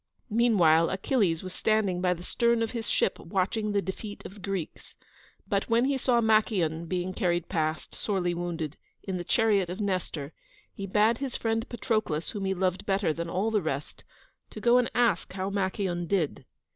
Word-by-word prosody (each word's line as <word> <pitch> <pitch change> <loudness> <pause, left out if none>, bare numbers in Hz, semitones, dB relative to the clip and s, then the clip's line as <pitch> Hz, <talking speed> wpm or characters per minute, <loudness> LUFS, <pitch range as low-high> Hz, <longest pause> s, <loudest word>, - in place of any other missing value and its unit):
Meanwhile 180 -8 +4
Achilles 190 -4 +1
was 185 -1 -7
standing 200 -5 +1
by 180 -1 +2
the 175 - -10
stern 235 +3 +2
of 225 - -2
his 230 -3 -4
ship - - +1
watching 200 +4 -1
the 200 -1 +1
defeat 205 +2 -6
of - - -8
the 210 - -14
Greeks, 195 -4 -5 0.5
but 200 0 0
when 230 +2 +4
he 275 +1 +1
saw 250 -2 +2
Machaon 195 -7 +2
being 185 +1 -2
carried 175 -2 0
past, 155 -3 -2
sorely 185 -4 -1
wounded, 170 -2 -4 0.3
in 190 -2 -3
the 175 - -4
chariot 200 -2 +2
of 180 - -5
Nestor, 180 -7 -2 0.4
he 195 - -6
bade 215 +4 +3
his 270 -3 -3
friend 225 +1 -1
Patroclus, 215 -10 -1
whom 205 -3 -4
he 190 0 0
loved 185 0 -1
better 195 -4 +1
than 170 +1 -4
all 200 +6 0
the 210 -2 +2
rest, 150 -3 -4 0.5
to - - -8
go 240 0 +5
and 245 - +1
ask 230 -9 +2
how 190 +1 -3
Machaon 190 -3 -1
did. 160 -8 -1
195 Hz, 185 wpm, -28 LUFS, 175-220 Hz, 0.5 s, go